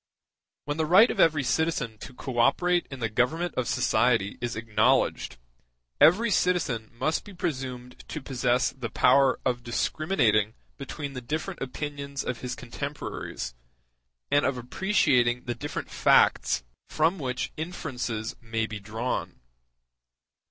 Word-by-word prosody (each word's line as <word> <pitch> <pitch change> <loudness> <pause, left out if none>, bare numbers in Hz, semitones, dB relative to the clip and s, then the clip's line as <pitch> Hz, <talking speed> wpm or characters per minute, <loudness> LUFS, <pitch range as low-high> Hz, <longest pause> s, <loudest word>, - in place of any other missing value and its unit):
When 145 +1 -3
the 160 -1 0
right 195 +8 +7
of - - -6
every 155 -3 +4
citizen 125 -7 -1
to 125 - -9
co 125 -2 -4
operate 175 +8 +3
in 135 -2 -8
the 115 - +1
government 125 +11 0
of 125 -2 -2
society 110 -3 +1
is 120 -1 -2
acknowledged, 110 - +1 0.6
every 220 +7 +5
citizen 160 - +1
must 155 +7 -1
be 205 -2 -12
presumed 130 -6 -5
to 155 - -5
possess 125 -2 0
the 125 -4 -6
power 130 +3 +4
of 120 -1 0
discriminating 120 - +1 0.2
between 140 +1 -6
the 125 - -6
different 160 +9 -4
opinions 140 +1 -4
of 125 - -3
his 125 -1 -4
contemporaries, 135 - -6 0.8
and 145 - +4
of 130 -1 0
appreciating 125 - +2
the 120 - -3
different 145 +5 -6
facts - - +3 0.3
from 165 +4 +1
which 130 -3 -3
inferences 130 -9 -4
may 115 -1 -2
be 110 -1 -6
drawn. 110 +5 -4
130 Hz, 135 wpm, -27 LUFS, 120-155 Hz, 0.8 s, right